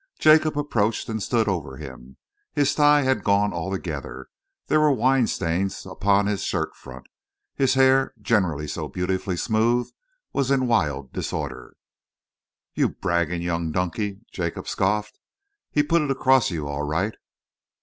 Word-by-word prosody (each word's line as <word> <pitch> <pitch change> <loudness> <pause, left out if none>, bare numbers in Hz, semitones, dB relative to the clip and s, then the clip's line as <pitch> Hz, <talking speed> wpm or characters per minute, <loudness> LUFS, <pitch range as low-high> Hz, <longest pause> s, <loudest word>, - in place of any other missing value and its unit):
Jacob 155 -1 +4
approached 115 -7 0
and 110 -1 -3
stood 110 +2 +1
over 75 -9 -3
him. 65 -3 -11 0.4
His 145 -1 +2
tie 145 -1 +5
had 130 0 +1
gone 100 +1 +2
altogether, 80 -8 -5 0.4
there 155 - +2
were 155 -1 +4
wine 130 -1 +3
stains 90 +3 -2
upon 100 +2 +1
his 100 -1 -1
shirt - - -2
front, - - -12 0.5
his 135 -1 +2
hair, 135 0 +4
generally 90 -9 0
so - - -4
beautifully 90 0 -2
smooth, 115 +4 +1 0.4
was 135 -2 0
in 135 -2 +2
wild 75 - 0
disorder. - - -5 1.0
"You - - +2
bragging 85 0 -1
young 85 -2 -1
donkey!" 95 +4 -2
Jacob 85 -3 -4
scoffed. 105 +2 -1 0.5
"He's 145 0 +1
put 170 -1 +3
it 150 - -2
across 130 -1 +3
you 80 -5 -4
all 70 0 -3
right." 85 +9 -1
100 Hz, 140 wpm, -24 LUFS, 85-130 Hz, 1.0 s, tie